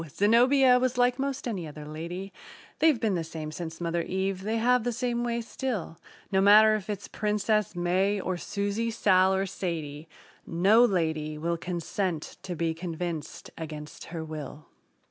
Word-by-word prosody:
Zenobia 250 - +5
was 255 0 0
like 245 +1 +3
'most 275 -1 -2
any 190 -8 -3
other 150 0 -9
lady 170 +5 -6 0.5
They've 310 -6 +4
been 220 -3 +1
the 170 -2 -1
same 160 -1 -6
since 165 0 -6
mother 170 0 -1
Eve; 190 +2 -2
they 220 +3 -1
have 245 +1 +3
the 245 - 0
same 240 0 -1
way 235 -1 -1
still: 225 -7 -4 0.3
No 190 -1 +3
matter 215 +2 +7
if 215 -1 -3
it's 205 -1 -4
Princess 210 -1 0
May, 185 +4 +1
or 185 -1 -2
Susie, 205 +5 -2
Sal 190 -4 +4
or 190 +1 0
Sadie, 160 -5 -5 0.3
No 195 +8 +4
lady 160 -7 0
will 170 +2 -1
consent 175 0 -3
to 180 - -5
be 165 0 0
convinced 165 -2 -5
against 150 -2 -7
her 165 -1 -6
will. 155 -1 -7
190 Hz, 165 wpm, -28 LUFS, 165-220 Hz, 0.5 s, matter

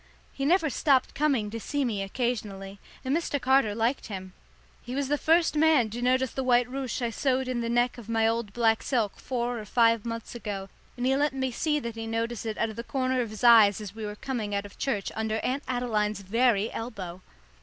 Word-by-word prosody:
He 275 - -3
never 330 +2 +3
stopped 265 0 +2
coming 270 -8 +1
to 230 - -4
see 285 +4 -1
me 215 -5 -1
occasionally, 200 -3 -3 0.3
and 265 +3 +1
Mr. 325 -4 -1
Carter 260 -5 +3
liked 230 +4 0
him. 190 -3 -7 0.5
He 245 +1 -6
was 275 -1 -1
the 295 - +3
first 325 0 +3
man 300 -8 +4
to 240 +2 -5
notice 255 0 +2
the 265 - -3
white 245 -1 +3
ruche 260 -1 -4
I 235 - 0
sewed 260 +1 0
in 250 -2 -1
the 230 - -2
neck 240 +1 +1
of 230 -1 -12
my 225 -1 +2
old 225 -2 -1
black 225 0 +2
silk 230 -6 -1
four 245 -2 -2
or 215 - -7
five 230 0 +3
months 230 -1 -5
ago, 205 -5 -5 0.3
and 245 - -2
he 265 +1 +3
let 290 0 +1
me 265 -1 -1
see 300 +5 0
that 235 -2 -4
he 225 0 -5
noticed 230 0 -2
it 220 - -3
out 225 - 0
of 215 - -12
the 235 - -4
corner 255 0 0
of 235 - -3
his 215 +2 -9
eyes 220 -4 +7
as 205 -3 -7
we 220 0 -7
were 210 0 -4
coming 215 -4 -3
out 200 0 -2
of 200 - -13
church, 210 -8 -1
under 220 0 -1
Aunt 265 +3 -1
Adeline's 215 -5 -1
very 225 +1 +2
elbow. 190 -6 -6
235 Hz, 225 wpm, -27 LUFS, 215-260 Hz, 0.5 s, eyes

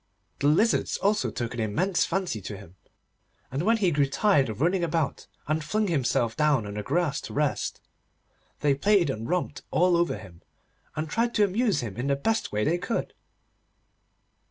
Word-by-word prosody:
The 140 - +2
Lizards 205 +10 +2
also 210 +2 +1
took 120 -1 -4
an 120 - -5
immense 140 - +1
fancy 175 - -2
to 100 +2 -6
him, 95 -3 -14 0.8
and 135 +3 -2
when 225 +6 +3
he 190 -5 +2
grew 145 -2 +2
tired 140 - +2
of 110 - -6
running 175 +4 +2
about 165 -3 -1 0.2
and 155 +1 0
flung 215 +8 0
himself 120 -6 +1
down 150 -7 +2
on 100 - -6
the 105 - -3
grass 145 - 0
to - - -8
rest, 145 -1 -1 0.8
they 145 -1 +3
played 175 +2 +3
and 115 0 -5
romped 180 0 -1
all 180 +1 +3
over 170 -8 +1
him, 95 -5 -13 0.5
and 155 +1 -2
tried 230 +7 0
to 210 - +4
amuse 205 - +1
him 110 -4 -6
in 125 +3 -2
the 140 - +2
best 225 +11 -1
way 105 0 0
they 170 +7 +1
could. 225 +6 -3
150 Hz, 180 wpm, -27 LUFS, 120-185 Hz, 0.8 s, to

